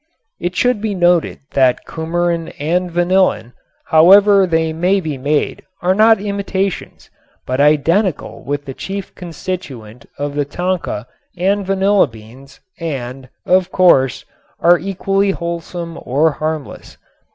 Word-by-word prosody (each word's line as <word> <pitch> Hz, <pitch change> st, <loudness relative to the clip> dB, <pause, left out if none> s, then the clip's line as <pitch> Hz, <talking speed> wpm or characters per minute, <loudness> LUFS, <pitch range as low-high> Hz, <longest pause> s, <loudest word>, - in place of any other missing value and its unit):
It 175 Hz, +1 st, -3 dB
should 245 Hz, -2 st, +1 dB
be 215 Hz, -2 st, -2 dB
noted 175 Hz, -2 st, +1 dB
that 130 Hz, -2 st, +2 dB
cumarin 170 Hz, +1 st, -2 dB
and 175 Hz, +5 st, -1 dB
vanillin, 175 Hz, -, +1 dB, 0.3 s
however 195 Hz, +4 st, +6 dB
they 160 Hz, -1 st, 0 dB
may 180 Hz, +5 st, +1 dB
be 160 Hz, -5 st, -4 dB
made, 145 Hz, +3 st, -1 dB, 0.2 s
are 180 Hz, +1 st, +3 dB
not 220 Hz, +1 st, +5 dB
imitations, 200 Hz, -1 st, -4 dB, 0.3 s
but 130 Hz, +2 st, -1 dB
identical 155 Hz, +5 st, +1 dB
with 145 Hz, 0 st, -4 dB
the 135 Hz, -, -6 dB
chief 195 Hz, +7 st, -6 dB
constituent 155 Hz, -, -7 dB
of 145 Hz, 0 st, -3 dB
the 145 Hz, 0 st, 0 dB
tonka 175 Hz, -, -3 dB, 0.3 s
and 200 Hz, +3 st, +1 dB
vanilla 195 Hz, -1 st, +3 dB
beans 115 Hz, +4 st, -15 dB, 0.2 s
and, 135 Hz, -5 st, -5 dB, 0.2 s
of 185 Hz, 0 st, +2 dB
course, 135 Hz, -7 st, +3 dB, 0.3 s
are 175 Hz, 0 st, +5 dB
equally 195 Hz, +1 st, -1 dB
wholesome 170 Hz, 0 st, -5 dB
or 150 Hz, +6 st, +1 dB
harmless. 155 Hz, 0 st, -5 dB
170 Hz, 125 wpm, -17 LUFS, 145-190 Hz, 0.3 s, however